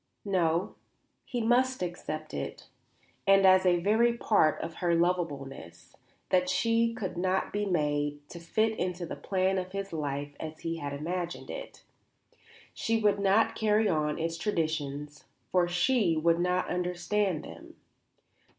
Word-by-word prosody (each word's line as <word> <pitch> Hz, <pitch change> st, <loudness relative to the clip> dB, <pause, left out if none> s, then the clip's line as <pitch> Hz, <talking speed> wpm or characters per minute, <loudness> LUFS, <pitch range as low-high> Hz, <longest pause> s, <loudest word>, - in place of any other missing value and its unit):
No; 175 Hz, -3 st, +1 dB, 0.5 s
he 245 Hz, -3 st, -3 dB
must 250 Hz, 0 st, +2 dB
accept 155 Hz, -3 st, -5 dB
it, 70 Hz, -, -6 dB, 0.6 s
and 195 Hz, 0 st, +6 dB
as 185 Hz, 0 st, +6 dB
a 175 Hz, -1 st, +4 dB
very 230 Hz, +5 st, +3 dB
part 155 Hz, -10 st, +3 dB
of 165 Hz, 0 st, -6 dB
her 175 Hz, -2 st, +1 dB
lovableness, 140 Hz, -, -2 dB, 0.3 s
that 180 Hz, 0 st, +2 dB
she 230 Hz, 0 st, +2 dB
could 185 Hz, -5 st, -4 dB
not 185 Hz, +1 st, 0 dB
be 205 Hz, 0 st, -1 dB
made 145 Hz, -4 st, -1 dB
to 170 Hz, -, -9 dB
fit 220 Hz, +6 st, 0 dB
into 180 Hz, -1 st, -2 dB
the -, -, -6 dB
plan 190 Hz, 0 st, 0 dB
of 185 Hz, +1 st, -6 dB
his 195 Hz, -2 st, -4 dB
life 145 Hz, -2 st, -3 dB
as 155 Hz, 0 st, -7 dB
he 165 Hz, 0 st, -3 dB
had 145 Hz, -3 st, -4 dB
imagined 170 Hz, +4 st, -4 dB
it. -, -, -8 dB, 0.9 s
She 225 Hz, 0 st, 0 dB
would 205 Hz, -2 st, +2 dB
not 200 Hz, +3 st, +3 dB
carry 215 Hz, 0 st, +2 dB
on 150 Hz, -4 st, 0 dB
its 165 Hz, 0 st, -2 dB
traditions, 150 Hz, -6 st, -2 dB, 0.3 s
for 180 Hz, -1 st, +3 dB
she 180 Hz, 0 st, +2 dB
would 165 Hz, +2 st, +3 dB
not 180 Hz, +1 st, +1 dB
understand 180 Hz, 0 st, -1 dB
them. -, -, -11 dB
180 Hz, 145 wpm, -29 LUFS, 160-200 Hz, 0.9 s, and